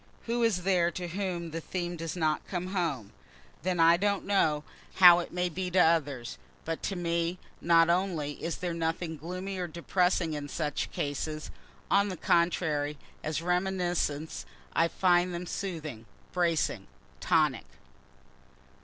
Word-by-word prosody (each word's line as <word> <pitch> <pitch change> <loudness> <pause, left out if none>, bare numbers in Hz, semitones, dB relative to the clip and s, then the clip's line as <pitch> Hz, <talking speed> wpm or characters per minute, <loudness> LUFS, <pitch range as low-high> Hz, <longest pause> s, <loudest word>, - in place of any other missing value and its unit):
Who 235 +1 -1
is 215 -6 +2
there 180 -2 +3
to 175 0 -5
whom 175 -2 -3
the 165 +1 -4
theme 175 +1 -3
does 165 0 -5
not 155 -3 0
come 180 +1 -4
home? 150 - -1 0.5
Then 180 -1 -1
I 165 +1 +6
don't 200 +1 0
know 155 -7 +2 0.3
how 175 -2 +9
it 175 - -5
may 180 0 0
be 180 +2 -3
to 180 - -1
others, 145 - +1 0.3
but 165 0 -3
to 195 - -4
me 170 0 -1 0.2
not 165 -1 +5
only 170 -5 -1
is 165 -1 -2
there 180 -1 -3
nothing 165 0 -2
gloomy 185 +5 -5
or 180 - -2
depressing 170 0 0
in 145 -1 -5
such 150 -1 -2
cases 155 +2 -3 0.4
on 200 +1 +4
the 185 - -5
contrary, 155 -4 +1 0.3
as 155 +1 -2
reminiscences, 180 - -1 0.3
I 165 - +3
find 175 0 +2
them 175 +1 -4
soothing, 155 - -5 0.3
bracing, 170 -3 0 0.3
tonic. - - +2
170 Hz, 145 wpm, -29 LUFS, 160-180 Hz, 0.5 s, how